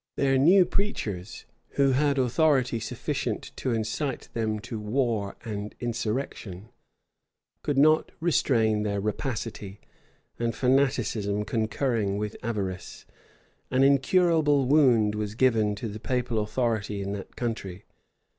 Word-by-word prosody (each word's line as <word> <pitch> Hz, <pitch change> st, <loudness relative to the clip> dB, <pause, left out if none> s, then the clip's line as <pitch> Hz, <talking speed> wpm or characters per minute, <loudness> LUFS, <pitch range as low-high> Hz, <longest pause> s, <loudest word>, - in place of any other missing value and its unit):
Their 135 Hz, -1 st, +2 dB
new 180 Hz, +6 st, +6 dB
preachers, 110 Hz, -, -3 dB, 0.3 s
who 140 Hz, -1 st, +3 dB
had 140 Hz, +1 st, +2 dB
authority 130 Hz, -1 st, +2 dB
sufficient -, -, -3 dB
to -, -, -2 dB
incite 115 Hz, +5 st, -2 dB
them 110 Hz, -2 st, -1 dB
to 110 Hz, +1 st, -6 dB
war 105 Hz, -2 st, -1 dB
and 105 Hz, -1 st, -5 dB
insurrection, 110 Hz, -4 st, -4 dB, 0.9 s
could 145 Hz, -, -1 dB
not 155 Hz, +3 st, +4 dB
restrain 115 Hz, -10 st, +2 dB
their 100 Hz, -1 st, -1 dB
rapacity; 105 Hz, -2 st, -4 dB, 0.6 s
and 115 Hz, 0 st, -1 dB
fanaticism 125 Hz, -6 st, +1 dB
concurring 110 Hz, -2 st, -1 dB
with 105 Hz, +1 st, -3 dB
avarice, 100 Hz, -5 st, -4 dB, 0.6 s
an 130 Hz, +1 st, +3 dB
incurable 145 Hz, +1 st, +3 dB
wound 125 Hz, -7 st, +4 dB
was 105 Hz, 0 st, -3 dB
given 110 Hz, -4 st, +2 dB
to 110 Hz, +3 st, -5 dB
the 110 Hz, 0 st, -7 dB
papal 125 Hz, -1 st, -1 dB
authority 105 Hz, -2 st, -1 dB
in 100 Hz, -, -4 dB
that 100 Hz, -1 st, -7 dB
country. 105 Hz, -6 st, -4 dB
115 Hz, 120 wpm, -27 LUFS, 105-135 Hz, 0.9 s, new